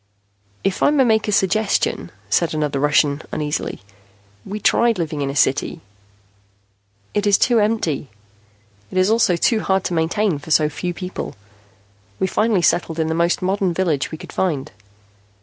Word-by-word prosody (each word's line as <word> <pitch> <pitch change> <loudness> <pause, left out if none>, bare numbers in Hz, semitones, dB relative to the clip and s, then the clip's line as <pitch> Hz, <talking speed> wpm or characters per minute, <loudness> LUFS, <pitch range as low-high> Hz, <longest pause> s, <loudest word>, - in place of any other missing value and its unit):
"If 195 -1 -1
I - - +5
may 290 -2 +3
make 220 -3 +2
a - - 0
suggestion," 200 +2 +1 0.2
said 170 -2 +1
another 150 -3 -1
Russian 145 0 +2
uneasily. 150 -7 -3 0.6
"We 205 - -6
tried 235 +1 +3
living 155 -4 -3
in 140 - -1
a 140 - -5
city. 140 0 +1 1.3
It 205 0 0
is 200 - +5
too 240 -2 +3
empty. 205 - 0 0.8
It - - -5
is 185 +3 +3
also 220 -6 +3
too 220 +6 +2
hard 190 -2 0
to 180 - -2
maintain 165 +1 0
for 145 - -12
so 155 -1 +3
few 175 +4 -4
people. 185 -1 -6 0.8
We - - 0
finally 210 -1 +1
settled 170 -2 +1
in 160 -1 0
the - - 0
most 170 +2 +1
modern 190 -2 0
village 165 -7 0
we 160 - -7
could - - -11
find." 155 -8 -1
180 Hz, 165 wpm, -20 LUFS, 155-205 Hz, 1.3 s, I